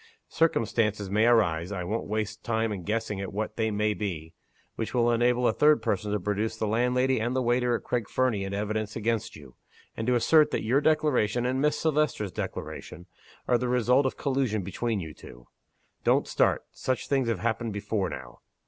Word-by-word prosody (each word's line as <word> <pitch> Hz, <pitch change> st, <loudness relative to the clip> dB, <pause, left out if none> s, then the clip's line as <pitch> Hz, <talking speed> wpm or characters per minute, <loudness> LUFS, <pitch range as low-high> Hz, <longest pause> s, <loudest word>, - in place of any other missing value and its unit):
Circumstances 110 Hz, -9 st, +1 dB
may 110 Hz, +3 st, +3 dB
arise 90 Hz, -7 st, +2 dB
I 95 Hz, -3 st, -3 dB
won't 110 Hz, +6 st, -3 dB
waste 110 Hz, 0 st, -3 dB
time 110 Hz, -1 st, 0 dB
in 100 Hz, -3 st, -4 dB
guessing 105 Hz, +1 st, -2 dB
at 95 Hz, -, -5 dB
what 105 Hz, +2 st, -3 dB
they 110 Hz, -1 st, 0 dB
may 105 Hz, 0 st, 0 dB
be 85 Hz, -7 st, -5 dB, 0.4 s
which 110 Hz, +2 st, -4 dB
will 120 Hz, -1 st, +3 dB
enable 120 Hz, +1 st, +2 dB
a -, -, +2 dB
third 150 Hz, +2 st, +4 dB
person 105 Hz, -1 st, -1 dB
to 105 Hz, -, 0 dB
produce 105 Hz, +3 st, -2 dB
the 110 Hz, -, -1 dB
landlady 125 Hz, +4 st, +1 dB
and 120 Hz, +3 st, -1 dB
the 130 Hz, -, +1 dB
waiter 120 Hz, 0 st, +2 dB
at -, -, -5 dB
Craig 120 Hz, -4 st, -2 dB
Fernie 125 Hz, -6 st, +1 dB
in 95 Hz, -, -4 dB
evidence 105 Hz, +1 st, -2 dB
against 115 Hz, 0 st, -1 dB
you 70 Hz, -4 st, -13 dB, 0.4 s
and 115 Hz, -, -4 dB
to 125 Hz, -, +3 dB
assert 155 Hz, +6 st, +5 dB
that -, -, -2 dB
your 130 Hz, +6 st, +3 dB
declaration 125 Hz, -7 st, +2 dB
and 130 Hz, +1 st, 0 dB
Miss 150 Hz, +1 st, +2 dB
Silvester's 150 Hz, -, 0 dB
declaration 85 Hz, +1 st, -6 dB, 0.4 s
are 120 Hz, -, +3 dB
the 125 Hz, 0 st, -1 dB
result 125 Hz, +2 st, +3 dB
of -, -, -5 dB
collusion 130 Hz, -7 st, 0 dB
between 105 Hz, +4 st, -2 dB
you 80 Hz, -4 st, -7 dB
two. -, -, -14 dB, 0.6 s
Don't -, -, +3 dB
start! -, -, +1 dB
Such 130 Hz, -6 st, -3 dB
things 135 Hz, -3 st, +1 dB
have 115 Hz, -, 0 dB
happened 115 Hz, 0 st, -1 dB
before 100 Hz, -2 st, -2 dB
now. 65 Hz, -5 st, -9 dB
110 Hz, 195 wpm, -27 LUFS, 105-125 Hz, 0.6 s, assert